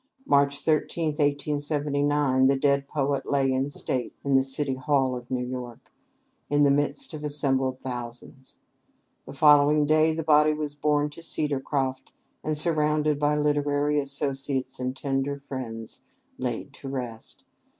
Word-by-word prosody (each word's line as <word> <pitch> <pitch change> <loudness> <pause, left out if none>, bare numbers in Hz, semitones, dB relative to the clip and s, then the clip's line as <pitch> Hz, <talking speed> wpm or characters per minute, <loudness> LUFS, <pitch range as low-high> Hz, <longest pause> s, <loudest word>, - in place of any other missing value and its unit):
March 140 - +3
13, 160 +1 +1
1879, 145 -2 +1
the 135 - +3
dead 140 0 +1
poet 140 -2 -1
lay 135 -2 +2
in 135 +2 0
state 130 -3 -3
in 140 - +1
the 135 0 +5
City 135 +1 -2
Hall 130 -1 +1
at 125 -1 -8
New 125 -1 -1
York, 125 -2 -7 0.6
in 145 0 +3
the 140 - +5
midst 145 +1 -1
of 150 -1 -7
assembled 135 -3 0
thousands. 125 +1 -8 0.7
The - - -9
following 150 0 +5
day 155 +1 +4
the 160 +1 -3
body 150 0 +4
was 150 -1 -3
borne 150 0 +1
to 155 - -10
"Cedarcroft," 135 -4 -2 0.3
and, 155 0 -1
surrounded 150 -2 +1
by 150 0 +2
literary 145 0 +1
associates 140 -1 -2
and 130 +1 -3
tender 140 0 -1
friends, 125 -5 -7 0.4
laid - - -4
to 135 - -8
rest. 120 -4 -6
140 Hz, 140 wpm, -26 LUFS, 135-150 Hz, 0.7 s, the